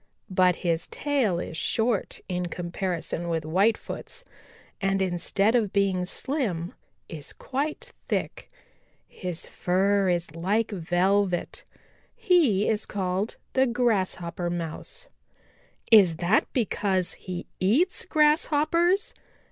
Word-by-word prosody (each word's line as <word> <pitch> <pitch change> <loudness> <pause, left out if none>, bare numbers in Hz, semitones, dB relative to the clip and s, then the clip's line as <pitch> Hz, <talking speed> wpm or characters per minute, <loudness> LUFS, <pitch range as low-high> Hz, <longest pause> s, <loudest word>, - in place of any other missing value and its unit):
But 185 -1 +4
his 165 -1 0
tail 260 -12 0
is 165 - -5
short 220 +6 0
in 180 -1 -2
comparison 175 -1 -3
with 165 -1 -1
Whitefoot's 195 +8 -1 0.6
and 195 0 +1
instead 190 +3 +1
of 220 -5 +2
being 195 -2 +1
slim 185 - -2 0.3
is 155 -4 -8
quite 285 +4 -4 0.2
thick. - - -3 0.6
His 180 -3 -5
fur 195 +2 +1
is 170 -3 -1
like 205 +7 0
velvet. 185 +1 0 0.5
He 345 - +3
is 215 -1 0
called 190 +1 -2 0.2
the 265 0 +3
Grasshopper 190 -8 0
Mouse." 175 - -4 0.8
"Is 195 -7 +7
that 175 +6 +1
because 195 -6 0
he 180 -2 -7
eats 265 - +2
Grasshoppers?" 310 +4 +2
195 Hz, 105 wpm, -26 LUFS, 175-235 Hz, 0.8 s, Is